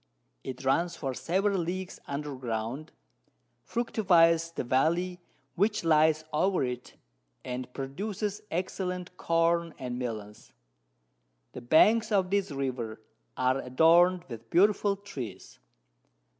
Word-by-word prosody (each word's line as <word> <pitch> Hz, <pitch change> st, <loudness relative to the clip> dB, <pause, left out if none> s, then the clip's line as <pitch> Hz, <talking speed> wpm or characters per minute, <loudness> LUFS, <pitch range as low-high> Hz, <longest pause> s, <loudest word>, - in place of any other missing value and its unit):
It 130 Hz, +1 st, -7 dB
runs 170 Hz, +6 st, +1 dB
for 135 Hz, -2 st, -3 dB
several 195 Hz, +7 st, 0 dB
Leagues 185 Hz, +2 st, -4 dB
under 145 Hz, +1 st, -4 dB
Ground, 120 Hz, +4 st, -4 dB, 0.7 s
fructifies 170 Hz, -8 st, +3 dB
the 165 Hz, -, -4 dB
Valley 170 Hz, +8 st, +1 dB, 0.3 s
which 210 Hz, +3 st, +1 dB
lies 155 Hz, -1 st, +4 dB
over 185 Hz, +2 st, +2 dB
it, 125 Hz, -1 st, -5 dB, 0.5 s
and 125 Hz, 0 st, -5 dB
produces 200 Hz, -, -4 dB
excellent 180 Hz, +1 st, -3 dB
Corn 165 Hz, -1 st, +1 dB
and 125 Hz, -1 st, -5 dB
Melons. 110 Hz, -4 st, -6 dB, 1.0 s
The 125 Hz, -, -8 dB
Banks 210 Hz, -, +4 dB
of 190 Hz, -3 st, +2 dB
this 200 Hz, -1 st, +1 dB
River 130 Hz, -6 st, -3 dB, 0.4 s
are 130 Hz, +1 st, +2 dB
adorn'd 170 Hz, +7 st, +4 dB
with 115 Hz, -2 st, -9 dB
beautiful 200 Hz, +2 st, +3 dB
Trees. 130 Hz, -, -8 dB
165 Hz, 110 wpm, -29 LUFS, 130-185 Hz, 1.0 s, lies